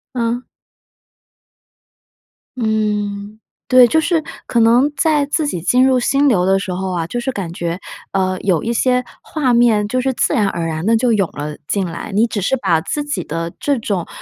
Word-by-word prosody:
嗯。 235 0 -1 2.2
嗯， 210 -2 -2 0.3
对。 255 -1 +7
就 320 +6 +2
是 325 -1 +1 0.2
可 235 - +1
能 240 +6 +4
在 305 -3 +2
自 305 +2 0
己 175 - -3
进 250 +8 +3
入 260 -1 +3
心 275 +3 +2
流 200 -9 +3
的 190 +1 +3
时 190 -2 -3
候 190 +1 -3
啊， 170 -2 -2
就 240 +8 -4
是 265 +2 -2
感 180 -7 -5
觉， 175 0 -3 0.3
呃， 185 -1 0
有 185 -5 +1
一 235 +1 -1
些 250 +2 +2 0.2
画 270 -6 -1
面 225 -3 +3
就 255 +3 -1
是 265 +1 0
自 - - 0
然 210 -3 +2
而 170 -3 -2
然 160 -1 -3
地 230 - +3
就 240 0 +2
涌 195 -5 +1
了 150 +1 -5
进 195 -2 0
来。 170 +2 -6
你 215 +4 +3
只 215 -4 -3
是 265 +8 +1
把 165 -9 +1
自 295 - -3
己 250 - -3
的 165 +1 -4
这 285 -2 0
种， 200 -6 -2
220 Hz, 205 characters per minute, -18 LUFS, 185-255 Hz, 2.2 s, 对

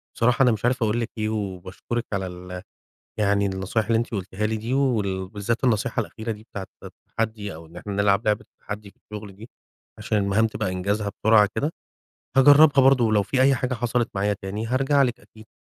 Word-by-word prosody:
بصراحة 125 +3 +3
أنا 125 - +5
مش 110 0 -2
عارف 125 -1 +1
أقول 110 +2 +1
لِك 115 - -2
إيه، 110 0 -1
وباشكرِك 100 +3 -4
على 95 -2 -1
ال 90 0 -8 0.6
يعني 100 -1 +2
النصائح 95 +3 -1
اللي 115 -1 +2
أنتِ 120 - -2
قلتيها 100 +1 -2
لي 110 +1 -1
دي، 115 +4 -3
وال 100 -9 0
بالذات 110 +4 -2
النصيحة 120 +1 +1
الأخيرة 110 +1 -5
دي 105 0 -10
بتاعة 100 -4 -8 0.2
التحدّي، 110 -4 -5
أو 80 +1 -11
إن 85 - -16
إحنا 100 +3 -6
نلعب 100 +1 +2
لعبة 105 -1 +2 0.2
التحدّي 105 0 -7
في - - -33
الشغل 105 -2 -10
دي، 110 +3 -12 0.5
عشان 105 - -1
المهام 100 +3 +2
تبقى 110 -4 -3
إنجازها 100 +3 -1
بسرعة 110 -2 +6
كده. 150 +4 -1 0.6
هاجرّبها 145 +1 +7
برضو، 130 -4 +5
ولو 105 -2 +3
في 130 +7 -1
أي 135 0 +5
حاجة 125 0 -2
حصلت 120 0 0
معايا 100 +1 +1
تاني 105 +4 -4
هارجع 135 +3 +2
لِك 125 -3 -1
أكيد. 110 0 -17
110 Hz, 195 wpm, -24 LUFS, 100-120 Hz, 0.6 s, هاجرّبها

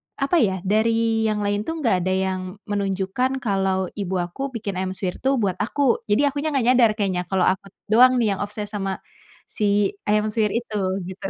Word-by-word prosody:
apa 280 +5 +1
ya, 190 - +1
dari 225 +2 +2
yang 210 -1 -1
lain 205 +1 -1
tuh 325 - -2
nggak 230 -6 +3
ada 185 +1 0
yang 190 0 -1 0.3
menunjukkan 200 +7 -1
kalau 190 -3 0
ibu 190 -1 -2
aku 175 +8 -5
bikin 200 -4 -4
ayam 185 0 -3
suwir 185 -1 -4
tuh 270 +1 +1
buat 200 -7 0
aku. 245 +4 +1
Jadi 210 +7 +2
akunya 285 +2 -1
nggak 255 - +1
nyadar 240 -3 +5
keknya 190 -4 0
kalau 190 -2 +1
aku 190 +1 -5 0.2
doang 255 +3 +7
nih 220 -4 +2
yang - - -10
obsess 205 0 -6
sama 195 -2 -3 0.5
si 205 -2 +1 0.2
ayam 210 +1 +2
suwir 210 -2 +1
itu, 235 -2 -3 0.3
gitu. 190 +1 -6
205 Hz, 190 wpm, -23 LUFS, 190-230 Hz, 0.5 s, doang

